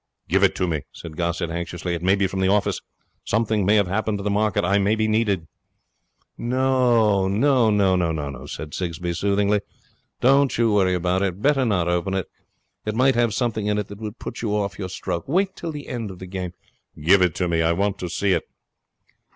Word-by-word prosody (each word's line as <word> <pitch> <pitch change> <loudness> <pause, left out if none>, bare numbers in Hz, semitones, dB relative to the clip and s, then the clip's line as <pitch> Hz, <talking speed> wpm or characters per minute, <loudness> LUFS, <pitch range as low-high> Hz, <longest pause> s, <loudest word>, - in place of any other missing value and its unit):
'Give - - +2
it - - +4
to 90 - 0
me,' 80 -4 -1
said 80 -2 -10
Gossett 85 0 -2
anxiously. 85 +1 -4
'It 85 - -3
may 95 +2 +3
be 100 -1 +1
from 95 0 -3
the 95 - +2
office. 100 +1 +1 0.4
Something 110 -1 +1
may 105 - +5
have 100 -2 +4
happened 105 +3 -1
to 100 - -6
the 105 - 0
market. 105 -1 +1
I 100 +2 +3
may 100 +2 +2
be 110 0 0
needed.' 105 -6 +1 0.9
'No, 120 -5 +2
no,' 95 - +1
said 75 -1 -7
Sigsbee, 85 -1 -3
soothingly. 100 +3 +1 0.6
'Don't 135 +2 +4
you 115 -2 +3
worry 95 -3 +3
about 90 +1 0
it. 95 -1 -1
Better 135 +2 +2
not 90 -7 +1
open 90 +2 0
it. 95 - -1 0.6
It 110 0 -3
might 130 +3 +4
have 120 -1 +2
something 110 -4 -1
in 105 0 +1
it 105 - -3
that 100 0 -9
would 110 +1 -6
put - - -7
you 105 -3 -1
off 100 -3 -2
your 95 -2 -4
stroke. 90 -2 -4
Wait 190 +6 +1
till 165 - -5
the 145 -2 -8
end 115 -5 -4
of 95 - -9
the 95 - -8
game.' 90 -1 -5 0.5
'Give 90 +6 +5
it 90 -3 +2
to 90 - 0
me. 85 -1 +1
I 80 +1 +3
want 100 +2 -1
to 90 - -4
see 100 +3 0
it.' - - -1
100 Hz, 210 wpm, -23 LUFS, 90-110 Hz, 0.9 s, may